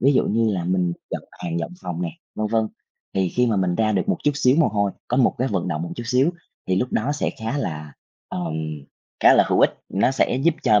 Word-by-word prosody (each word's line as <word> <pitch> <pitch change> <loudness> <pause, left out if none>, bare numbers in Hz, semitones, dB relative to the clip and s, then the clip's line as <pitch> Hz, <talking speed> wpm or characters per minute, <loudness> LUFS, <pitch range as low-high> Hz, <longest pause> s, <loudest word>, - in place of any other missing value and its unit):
ví 140 +3 +5
dụ 130 - +3
như 115 +1 +2
là 90 -2 -2
mình 90 -1 +1 0.2
dọn - - -3
hàng, 85 -1 -4
dọn 85 - -3
phòng 90 -1 -4
nè, 85 - -2 0.2
vân 110 - -1
vân, 110 0 +1 0.5
thì 95 -1 +2
khi 125 +7 +1
mà 110 -4 +1
mình 90 -2 +1
ra 110 +3 +2
được 95 -3 0
một - - +1
chút 145 - +4
xíu 135 -1 +3
mồ 165 - +4
hôi, 100 -1 +1 0.2
có 125 - 0
một 130 -3 +4
cái 130 +2 +1
vận 95 -6 -1
động 80 -2 -2
một 85 - -5
chút 120 - -4
xíu, 130 +6 +3 0.4
thì 95 - +1
lúc 125 +6 -1
đó 130 +7 +1
sẽ 150 - -1
khá 115 +6 -2
là, 75 - -4 0.4
ờm, 85 -3 -3 0.7
khá - - +7
là - - +6
hữu - - +3
ích, - - +6 0.2
nó 100 - +2
sẽ 130 - +1
giúp 150 +5 +2
cho 105 -1 +5
105 Hz, 255 wpm, -23 LUFS, 90-125 Hz, 0.7 s, khá